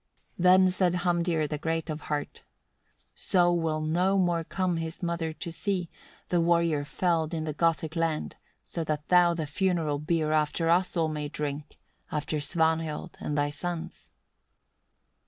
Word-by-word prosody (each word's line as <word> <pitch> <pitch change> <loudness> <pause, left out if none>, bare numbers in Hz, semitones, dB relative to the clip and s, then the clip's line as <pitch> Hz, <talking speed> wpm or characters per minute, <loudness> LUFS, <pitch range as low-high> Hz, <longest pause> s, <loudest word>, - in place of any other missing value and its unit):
8. - - -3
Then 185 +1 +6
said 180 -1 +1
Hamdir, 175 -3 +1
the 150 0 -4
great 165 +1 -2
of 155 -1 -4
heart: 145 -1 -4 0.7
"So 175 -2 +2
will 160 -2 0
no 180 +5 +2
more 175 -3 +2
come 180 +1 -1
his 165 +2 -5
mother 170 -2 -1
to 170 +2 -6
see, 180 -1 -2 0.4
the 175 -1 +2
warrior 170 -3 +2
felled 165 +1 0
in 160 - -2
the 155 -1 -3
Gothic 160 0 0
land, 165 -2 -1 0.3
so 165 - -4
that 150 -1 -3
thou 175 -1 +5
the 160 -2 -2
funeral 165 -2 0
beer 155 0 0
after 155 +2 +1
us 180 +1 +2
all 165 -1 +2
may 150 -1 -3
drink, 145 -1 -5 0.3
after 150 0 -2
Svanhild 160 0 0
and 150 - -3
thy 145 0 +1
sons." 170 +2 -6
165 Hz, 155 wpm, -28 LUFS, 155-175 Hz, 0.7 s, Then